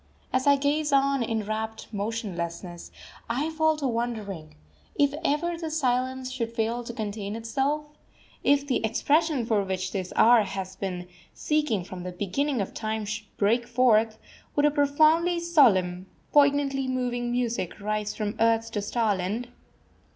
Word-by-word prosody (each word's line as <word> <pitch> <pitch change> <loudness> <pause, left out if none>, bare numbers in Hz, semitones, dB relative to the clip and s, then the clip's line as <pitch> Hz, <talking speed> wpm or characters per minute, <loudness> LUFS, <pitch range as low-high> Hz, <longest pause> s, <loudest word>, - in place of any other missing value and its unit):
] - - -33
As 260 +2 +1
I 285 - +7
gaze 290 +2 0
on 275 -1 +3
in 225 -2 -1
rapt 220 +1 -4
motionlessness, 185 -5 -4 0.4
I 280 +7 -1
fall 315 -1 +2
to 285 -3 -1
wondering 220 -9 -4 0.4
If 285 -1 +3
ever 335 +3 0
this 320 -2 -3
silence 255 0 0
should 235 -3 -3
fail 230 +1 -1
to 235 - -5
contain 210 -3 -4
itself, 270 +7 -1 0.6
if 285 0 +3
the 260 -5 0
expression 285 +4 +1
for 215 -3 +1
which 190 -1 -3
this 185 -3 -4
hour 235 0 +6
has 190 -2 -5
been 180 -2 -4 0.3
seeking 300 - 0
from 185 0 -8
the 180 +1 -5
beginning 225 +8 -1
of 195 - -4
time 220 -1 -3
should 215 +1 -5
break 230 +4 +2
forth, 230 -3 +3 0.4
would 290 - +3
a 295 - +4
profoundly 310 +4 +3
solemn, 195 - +3 0.2
poignantly 280 -2 +3
moving 245 -1 -1
music 235 -7 -2
rise 210 0 -2
from 210 -1 -2
earth 230 0 +2
to 205 - -2
starland? 210 +1 -1
235 Hz, 150 wpm, -26 LUFS, 205-280 Hz, 0.6 s, I